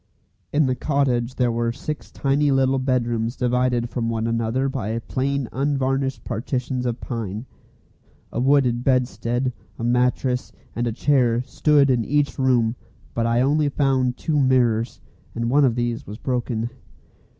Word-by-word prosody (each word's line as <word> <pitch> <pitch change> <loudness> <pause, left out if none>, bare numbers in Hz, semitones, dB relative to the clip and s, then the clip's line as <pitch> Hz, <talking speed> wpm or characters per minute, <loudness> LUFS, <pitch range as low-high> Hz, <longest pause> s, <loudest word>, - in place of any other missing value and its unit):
In 150 0 +3
the 130 - +1
cottage 130 -3 0
there 125 -2 +2
were 115 0 0
six 150 +5 -6
tiny 140 +1 +1
little 135 0 +3
bedrooms 120 -2 0
divided 125 -1 +1
from 115 -1 -2
one 115 -1 -1
another 115 +3 0
by 115 -5 -2
plain 135 +3 -2
unvarnished 135 -1 -1
partitions 125 +2 -2
of 120 0 -2
pine. 110 -2 -4 0.9
A - - -3
wooden 130 -2 +3
bedstead, 125 -1 0 0.2
a - - -6
mattress, 125 +1 +1 0.2
and 120 +1 -1
a - - 0
chair, 125 -1 +2
stood 140 0 +3
in 120 -2 +2
each 140 +1 0
room, 120 -3 +2 0.4
but 115 0 0
I 115 +1 +2
only 145 +2 +2
found 130 -3 +1
two 155 -3 0
mirrors, 120 -4 +2 0.4
and 115 0 -1
one 145 +2 +5
of 120 -3 +2
these 120 -1 -2
was 105 - -7
broken. 120 -2 -2
125 Hz, 150 wpm, -23 LUFS, 115-135 Hz, 0.9 s, one